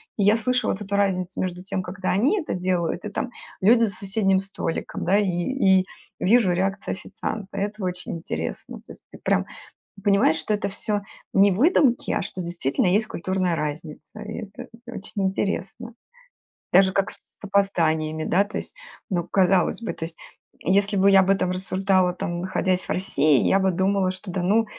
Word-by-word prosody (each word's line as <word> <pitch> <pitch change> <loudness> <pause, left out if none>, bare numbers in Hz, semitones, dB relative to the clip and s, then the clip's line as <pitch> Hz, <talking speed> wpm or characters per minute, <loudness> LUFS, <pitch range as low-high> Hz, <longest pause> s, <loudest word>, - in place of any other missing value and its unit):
я 205 +2 +4
слышу 250 +1 0
вот 190 - -1
эту 200 -1 -3
разницу 190 -2 0
между 180 -1 -3
тем, 190 0 -3
когда 185 +1 -3
они 265 - +2
это 305 - -4
делают 180 -1 -1
и 210 - -4
там 240 +4 -3 0.3
люди 230 +4 +5
за 225 - +2
соседним 195 0 +1
столиком, 195 -4 -4
да, 190 +3 +3
и 210 - +2 0.6
и - - -7 0.3
вижу 205 -2 +4
реакцию 195 +2 -1
официанта. 200 0 -6
Это 205 +1 -3
очень 180 -1 -3
интересно. 165 - -5
То - - -13
есть - - -17
ты - - -12
прям - - +1 0.6
понимаешь, 200 -5 +3
что 160 - -2
это 210 -1 0
всё 205 +1 -1 0.3
не 200 0 +5
выдумки, 260 - +3
а - - 0
что 190 -1 -5
действительно 170 -3 -1
есть 210 +4 +2
культурная 185 -2 -1
разница. 150 +4 -6
И 215 +1 -6
это 250 +4 -9 0.2
очень 200 -3 -4
интересно. 195 +4 -3 0.8
Даже 190 +1 +6
как 195 +1 0
с - - -10 0.2
опозданиями, 160 -6 +1
да 185 +5 +3
то 205 - -6
есть. - - -6 0.4
Ну 175 -2 0
казалось 190 +3 +2
бы 225 - -3
то 165 - -5
есть, 165 0 -7 0.4
если 200 +3 +2
бы 195 +1 +5
я 195 -1 +7
об 190 - 0
этом 190 -2 +2
рассуждала, 185 0 +2
там 175 -1 -4
находясь 185 0 0
в - - -18
России, 155 -6 +2
я 195 - +4
бы 190 0 +2
думала, 190 +1 +1
что 185 +1 -9
да 180 0 -2
ну, 215 +5 +3
190 Hz, 180 wpm, -24 LUFS, 180-205 Hz, 0.8 s, я